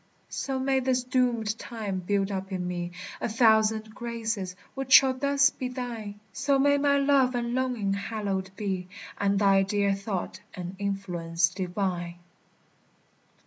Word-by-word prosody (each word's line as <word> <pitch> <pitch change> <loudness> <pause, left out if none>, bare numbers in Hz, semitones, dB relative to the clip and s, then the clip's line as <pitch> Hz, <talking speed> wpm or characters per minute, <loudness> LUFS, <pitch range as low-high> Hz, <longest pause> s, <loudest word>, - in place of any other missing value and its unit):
So 270 -1 -3
may 265 0 +1
this 255 -1 0
doomèd 240 -4 +1
time 210 -5 -4
build 195 +2 0
up 190 0 -4
in 180 -1 -2
me 175 -1 -3 0.3
A - - -1
thousand 220 -1 +3
graces, 225 -6 -3 0.2
which 270 -1 -1
shall 265 0 +8
thus 280 +1 +3
be 255 - -4
thine; 235 -5 -6
So 280 0 +2
may 285 +1 +4
my 280 0 +3
love 275 -2 +3
and 235 0 -1
longing 245 -6 0
hallowed 200 -2 -3
be, 190 -3 -3 0.3
And 200 0 +2
thy 195 -1 +5
dear 200 0 +1
thought 195 -2 -4 0.2
an 180 +1 -6
influence 175 -4 0
divine. 180 -1 -3
215 Hz, 145 wpm, -27 LUFS, 195-255 Hz, 0.3 s, shall